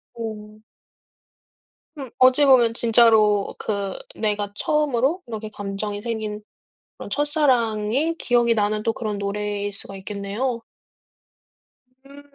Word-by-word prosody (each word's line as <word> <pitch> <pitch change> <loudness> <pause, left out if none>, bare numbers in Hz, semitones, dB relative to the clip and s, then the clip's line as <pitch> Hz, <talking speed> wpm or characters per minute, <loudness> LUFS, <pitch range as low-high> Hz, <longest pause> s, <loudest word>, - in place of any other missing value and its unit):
오. 215 -1 -8 1.3
음 270 -4 -7
어찌 255 +3 +5
보면 240 -4 +5
진짜로 220 -3 +4
그 200 -2 -2 0.2
내가 205 -2 -2
처음으로 300 - 0
이렇게 220 -1 -6
감정이 205 0 -5
생긴 220 -2 -4 0.6
그런 - - -8
첫사랑이 275 -1 +1
기억이 240 -4 +2
나는 210 0 0
또 225 +1 0
그런 210 -3 -4
노래일 205 0 -3
수가 195 0 -5
있겠네요. 210 +5 -3 1.4
음. 280 +1 -13
220 Hz, 235 characters per minute, -22 LUFS, 210-250 Hz, 1.4 s, 어찌